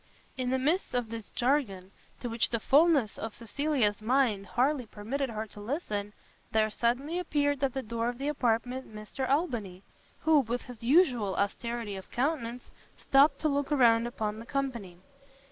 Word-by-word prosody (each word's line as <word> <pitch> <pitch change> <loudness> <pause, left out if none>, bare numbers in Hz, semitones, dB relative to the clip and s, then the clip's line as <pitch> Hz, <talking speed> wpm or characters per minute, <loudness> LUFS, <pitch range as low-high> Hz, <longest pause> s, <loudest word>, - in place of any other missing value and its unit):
] - - -32
In 255 -1 -2
the 260 - +2
midst 300 +4 0
of 240 -2 -1
this 225 -2 -6
jargon, 240 -8 0 0.3
to 245 - -3
which 230 -1 0
the 230 - -1
fulness 280 -3 +3
of 225 -1 -5
Cecilia's 235 -2 0
mind 225 -4 +1
hardly 250 +6 +1
permitted 255 +7 -3
her 220 -1 -4
to 210 - -13
listen, 210 -4 -3 0.4
there 215 -1 +2
suddenly 260 - 0
appeared 285 -5 0
at 270 -2 0
the 265 - -2
door 230 +2 -2
of 245 - -5
the 275 +2 -3
apartment, 250 -3 -1
Mr 215 +5 -5
Albany, 235 - -1 0.4
who, 315 -2 +5
with 245 -1 -2
his 245 -4 -11
usual 245 - +3
austerity 225 +1 -2
of 190 - -10
countenance, 250 -3 -2 0.3
stopt 275 +3 +4
to 310 - +2
look 285 -1 0
round 235 -5 +4
upon 215 -2 -3
the 230 - -9
company. 235 -10 -3
245 Hz, 170 wpm, -29 LUFS, 220-275 Hz, 0.4 s, who